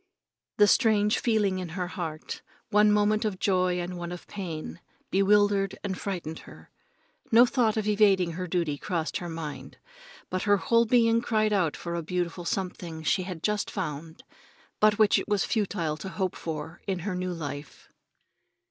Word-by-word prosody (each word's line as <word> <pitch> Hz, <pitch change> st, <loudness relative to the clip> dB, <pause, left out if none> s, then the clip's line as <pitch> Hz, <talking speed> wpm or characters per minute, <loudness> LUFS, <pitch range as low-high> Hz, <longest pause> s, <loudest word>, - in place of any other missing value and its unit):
The 210 Hz, -, +7 dB
strange 210 Hz, -1 st, +3 dB
feeling 210 Hz, -5 st, +1 dB
in 180 Hz, -2 st, -5 dB
her 180 Hz, -1 st, -2 dB
heart, 160 Hz, -4 st, -5 dB, 0.3 s
one 210 Hz, 0 st, +5 dB
moment 210 Hz, +1 st, +3 dB
of 210 Hz, -4 st, -1 dB
joy 185 Hz, -2 st, +1 dB
and 175 Hz, 0 st, -4 dB
one 175 Hz, 0 st, -5 dB
of 180 Hz, -, -8 dB
pain, 160 Hz, -, -6 dB, 0.3 s
bewildered 200 Hz, 0 st, +3 dB
and 195 Hz, -2 st, -2 dB
frightened 175 Hz, -5 st, -5 dB
her. -, -, -15 dB, 0.6 s
No 235 Hz, +2 st, +8 dB
thought 235 Hz, -4 st, +1 dB
of 215 Hz, -, 0 dB
evading 200 Hz, -4 st, +4 dB
her 180 Hz, +2 st, -4 dB
duty 165 Hz, -5 st, -1 dB
crossed 170 Hz, -5 st, -2 dB
her 175 Hz, -, -6 dB
mind, 160 Hz, -3 st, -7 dB, 0.5 s
but 185 Hz, -, -1 dB
her 205 Hz, -1 st, +3 dB
whole 230 Hz, +4 st, +3 dB
being 230 Hz, 0 st, +4 dB
cried 215 Hz, -2 st, +1 dB
out 180 Hz, -7 st, +1 dB
for 170 Hz, -, -5 dB
a 170 Hz, -, -2 dB
beautiful 175 Hz, +1 st, -3 dB
something 170 Hz, -3 st, -4 dB
she 185 Hz, -, +2 dB
had 165 Hz, -3 st, -7 dB
just 210 Hz, -1 st, 0 dB
found, 160 Hz, -3 st, -5 dB, 0.6 s
but 210 Hz, -1 st, +4 dB
which 215 Hz, -1 st, +5 dB
it -, -, -6 dB
was 205 Hz, -2 st, +1 dB
futile 175 Hz, -8 st, -1 dB
to 190 Hz, -, -6 dB
hope 190 Hz, -2 st, -2 dB
for 160 Hz, 0 st, -6 dB
in 190 Hz, -1 st, 0 dB
her 205 Hz, -, -1 dB
new 180 Hz, 0 st, -2 dB
life. 145 Hz, -4 st, -7 dB
185 Hz, 170 wpm, -27 LUFS, 170-210 Hz, 0.6 s, No